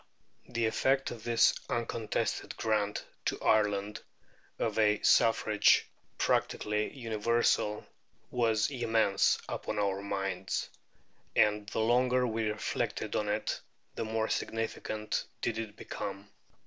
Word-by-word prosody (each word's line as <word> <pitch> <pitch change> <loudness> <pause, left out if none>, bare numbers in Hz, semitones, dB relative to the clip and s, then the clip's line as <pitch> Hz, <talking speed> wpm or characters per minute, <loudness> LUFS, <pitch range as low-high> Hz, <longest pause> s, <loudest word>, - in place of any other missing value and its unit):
The 115 -1 0
effect 135 +4 +1
of 115 -3 -8
this 115 -1 +4 0.2
uncontested 115 -1 -2
grant 105 -2 0 0.2
to - - -1
Ireland 105 -1 +1 0.6
of 110 -1 -1
a 105 -1 +4
suffrage 110 -3 +4 0.3
practically 105 0 0
universal 115 -2 +1 0.5
was 115 -1 +2
immense 115 -6 +2
upon 105 - -4
our 100 -1 0
minds, 95 -2 -3 0.6
and 105 -1 +3
the 110 - -1
longer 125 +2 +3
we 110 -2 -1
reflected 105 - -2
on - - 0
it - - -1 0.3
the - - -3
more 110 0 -1
significant 110 -1 -2 0.2
did 115 -1 -1
it 110 -2 -5
become. 100 -2 -6
110 Hz, 110 wpm, -31 LUFS, 105-115 Hz, 0.6 s, this